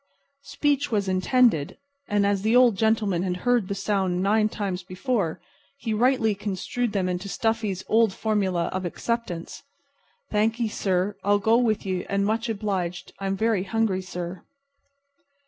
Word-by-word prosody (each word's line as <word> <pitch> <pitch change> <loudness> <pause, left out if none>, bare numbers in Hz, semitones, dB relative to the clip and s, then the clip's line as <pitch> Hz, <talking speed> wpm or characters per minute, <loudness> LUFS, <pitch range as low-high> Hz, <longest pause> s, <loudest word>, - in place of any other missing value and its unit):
Speech 290 -1 0
was 205 -3 0
intended; 185 - +2 0.3
and 205 -1 +2
as 200 -1 +1
the 220 +3 +2
Old 245 -4 +6
Gentleman 215 -4 +1
had 180 -1 -1
heard 245 -5 +3
the 200 - -3
sounds 195 -2 0
nine 215 +3 +2
times 195 -4 -3
before, 185 - -2 0.4
he 225 -5 -3
rightly 235 -1 +3
construed 205 +4 -3
them 195 -3 0
into 180 +2 -3
Stuffy's 220 -4 -1
old 225 -1 +4
formula 190 -5 0
of 185 0 -2
acceptance. 180 -1 -4 0.7
"Thankee, 220 +2 +1
sir. 195 0 -1
I'll 205 +1 +4
go 220 +3 +3
with 220 -5 +1
ye, 185 -2 -1
and 200 0 0
much 225 +2 0
obliged. 190 -5 -3
I'm 195 0 -2
very 220 -3 +1
hungry, 200 -1 0
sir." 180 -1 -6
205 Hz, 145 wpm, -25 LUFS, 185-225 Hz, 0.7 s, Old